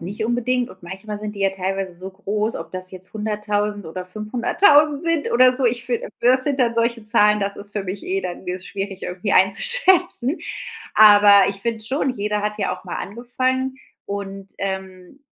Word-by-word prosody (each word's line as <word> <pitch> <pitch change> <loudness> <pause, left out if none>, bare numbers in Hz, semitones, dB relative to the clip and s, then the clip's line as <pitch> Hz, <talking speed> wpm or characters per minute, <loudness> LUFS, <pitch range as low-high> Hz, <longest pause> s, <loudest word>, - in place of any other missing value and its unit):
nicht 200 +5 -5
unbedingt 245 +1 -1
und 185 - -17
manchmal 195 +4 -7
sind 210 0 -6
die - - -7
ja 195 - +2
teilweise 190 0 -4
so 185 +2 -9
groß, 210 +3 -2
ob - - -8
das 185 0 -1
jetzt 185 0 -7
100.000 210 -1 -2
oder 180 +3 -7
500.000 285 - +2
sind 330 -3 0
oder 255 +1 +5
so. 255 -1 +3
Ich 235 0 +1
finde, 240 -1 -1
das 255 +2 +5
sind 285 -2 0
dann 235 -2 +2
solche 230 -1 -1
Zahlen 210 -1 +3
das 200 0 -2
ist 205 0 -6
für 205 -2 -3
mich 190 +2 -6
eh 195 +1 -1
dann, 180 0 -7
äh, 180 +1 -3
schwierig 195 0 -6
irgendwie 190 +3 -3
einzuschätzen. 350 - +3 0.5
Aber 205 -2 +7
ich 195 - -7
finde 225 -1 -3
schon, 265 0 -1
jeder 210 0 -2
hat 210 0 -3
ja 200 - -1
auch - - -15
mal 175 - -5
angefangen 255 +4 -2 0.3
und, 195 -1 -6
ähm, 190 +5 -6
210 Hz, 190 wpm, -21 LUFS, 195-245 Hz, 0.5 s, Aber